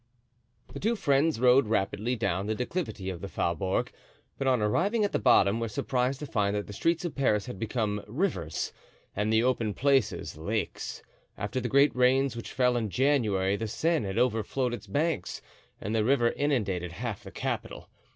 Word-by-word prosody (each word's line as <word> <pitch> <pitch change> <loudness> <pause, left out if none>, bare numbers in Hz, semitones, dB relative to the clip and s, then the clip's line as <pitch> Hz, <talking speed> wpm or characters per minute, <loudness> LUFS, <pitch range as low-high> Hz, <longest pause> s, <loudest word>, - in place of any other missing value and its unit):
The - - -6
two 225 +4 +1
friends 145 - +2
rode 125 0 +5
rapidly 110 +3 0
down 100 -3 -1
the 110 - 0
declivity 125 - -3
of 85 -2 -8
the 100 - -4
Faubourg, 95 0 -1 0.5
but 135 - -1
on 130 -2 +3
arriving 185 - +1
at 205 - -2
the - - 0
bottom 110 -4 +4
were 115 - -1
surprised 125 +4 -1
to - - -3
find 105 -6 0
that 105 - -2
the 105 - -9
streets 165 - 0
of 170 - -3
Paris 105 -7 +1
had 125 -7 -7
become 105 -2 -1
rivers, 115 - -2 0.4
and 105 +2 0
the 110 +1 +4
open 115 -5 0
places 135 - +1
lakes; 105 +7 -3 0.3
after 105 +5 -2
the 125 - -2
great 140 +2 +4
rains 130 +1 +3
which 115 - -7
fell 125 -1 +2
in 110 -3 -1
January 105 -7 +2
the 110 +2 -3
Seine 160 +1 0
had 95 - -4
overflowed 125 +1 +1
its 105 -3 -7
banks 145 - -1 0.4
and 105 - -4
the 110 -1 +2
river 120 -1 +3
inundated 100 - -1
half 115 +1 -5
the - - -9
capital. - - -4
115 Hz, 180 wpm, -28 LUFS, 105-135 Hz, 0.5 s, rode